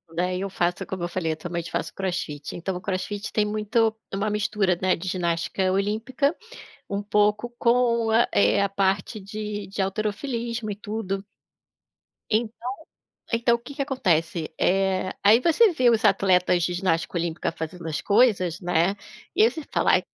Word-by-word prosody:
daí 180 +2 -1
eu 195 - -2
faço, 175 -2 -1
como 185 -2 -4
eu - - 0
falei, 170 -2 -2
atualmente 170 +1 -5
eu - - -10
faço - - -3
Crossfit, 175 -6 -3
então 180 +2 -3
o 180 - -5
crossfit 200 +2 -3
tem 210 - +2
muito 215 +1 +1 0.2
uma 200 +2 -1
mistura, 210 -3 +1
né, 185 -1 +3
de 185 - -7
ginástica 175 +1 0
olímpica, 220 - 0 0.5
um 200 0 -2
pouco 210 +3 +1
com, 235 -2 +2 0.2
eh, 100 - +4
a 200 - +2
parte 195 +1 0
de 210 0 -5
de 195 +1 -3
halterofilismo 225 +3 -2
e 200 - -4
tudo. 205 -2 -4 1.1
Então, 230 +2 -1 0.7
então 235 +1 +3
o - - -5
que 270 +4 -11
que 280 - -2
acontece? 170 - 0
Eh, 190 0 +1
aí 215 +4 +6
você 345 - +4
vê 255 -6 +4
os 225 -2 +2
atletas 180 -2 +3
de 175 - 0
ginástica 175 -1 0
olímpica 170 -1 -2
fazendo 165 +1 -7
as 155 -2 -2
coisas, 200 -6 +3
né, 175 +2 +2 0.4
e - - +5
aí 230 - +5
você 315 - -6
fala: - - +3
"Ai, - - +4
195 Hz, 165 wpm, -25 LUFS, 180-220 Hz, 1.1 s, aí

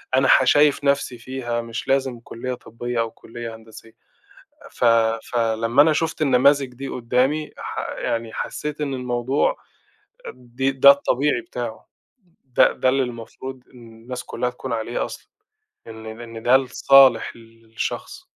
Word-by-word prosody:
أنا 135 +1 +3
ه - - +6
شايف 145 +1 +4
نَفْسي 140 -3 0
فيها، 120 -1 -4
مش 115 0 -6
لازم 135 -3 0
كليّة 120 +2 -6
طبّية 120 0 -5
أو 115 -1 -1
كليّة 115 0 -9
هندسية، 110 0 -15 0.8
ف - - -4 0.4
ف 120 - -7
لمّا 115 +3 +3
أنا 160 - +3
شُفت 160 0 -1
النماذج 140 +1 +4
دي 135 +2 -7
قدّامي 130 +6 0
ح - - -6 0.2
يعني 115 -1 -3
حسّيت 150 0 -5
إن 140 -3 -2
الموضوع 125 - 0 0.8
آآ، - - -7
دي 125 +2 -2
ده 135 +1 +8
الطبيعي 140 - 0
بتاعه، 345 - -7 0.6
ده 125 - +4
ده 130 - +1
اللي 135 +1 +2
المفروض 125 +2 -8
إن 120 -2 -14
الناس 125 +1 -6
كلّها 125 +1 -3
تكون 125 -1 -6
عليه 115 +1 -2
أصلًا، - - -10 0.6
إن 110 0 -9
إن 115 -1 -9
ده 130 +2 +6
لصالح 135 -1 +4
الشخص. 115 -1 -7
125 Hz, 145 wpm, -22 LUFS, 115-135 Hz, 0.8 s, ده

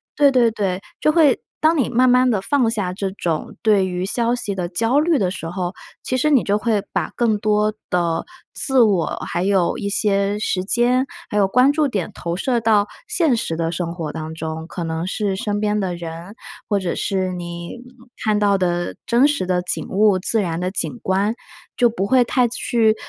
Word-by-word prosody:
对 285 -2 +5
对 245 -3 +4
对， 195 -3 -2 0.2
就 305 - +3
会 305 -5 +4 0.2
当 320 +1 +4
你 270 - +1
慢 250 +1 +3
慢 250 +1 +4
地 210 -5 +1
放 245 +2 +1
下 205 -5 -2
这 195 0 -3
种 170 -5 -3
对 205 -4 +3
于 180 0 -3
消 235 +4 0
息 210 -4 -3
的 180 -2 -3
焦 225 +10 +1
虑 320 -1 +2
的 185 -3 0
时 165 -4 -6
候， 180 0 -3 0.3
其 255 - -1
实 305 +4 +2
你 275 -5 +4
就 205 +1 +1
会 215 -2 0
把 185 -5 -2
更 225 -3 +1
多 210 0 +1 0.2
的 170 -2 0 0.3
自 265 -3 +2
我， 200 -7 +3 0.2
还 175 +1 -2
有 190 -3 +1
一 200 - -4
些 200 0 +1
时 185 -3 -1
间， 245 +5 +2 0.2
还 210 - -2
有 195 -2 +4
关 250 +7 +4
注 300 -1 +1
点 200 -9 -3
投 170 0 -4
射 240 +4 0
到 215 -2 +3 0.2
现 315 -8 +2
实 165 - -2
的 165 0 -1
生 170 -1 -3
活 160 -4 -4
当 160 0 -6
中。 160 0 -5
可 170 - -5
能 165 +2 -3
是 200 0 -1
身 205 0 -2
边 210 0 +1
的 185 -3 -2
人， 170 +4 -8 0.3
或 205 - +1
者 180 -3 -2
是 190 -2 -1
你 170 +2 -6 0.4
看 215 -2 +1
到 200 -1 +3
的 175 -1 -1
真 245 +4 +4
实 285 -10 -1
的 180 -1 +1
景 180 - -3
物， 200 -1 +3
自 220 +4 +1
然 170 -3 -2
的 180 +1 -1
景 240 +4 -3
观， 195 +4 +1 0.4
就 245 -2 +4
不 210 -4 -2
会 255 +3 +4
太 245 +1 +2
去， 225 -2 +1
205 Hz, 220 characters per minute, -20 LUFS, 180-235 Hz, 0.4 s, 对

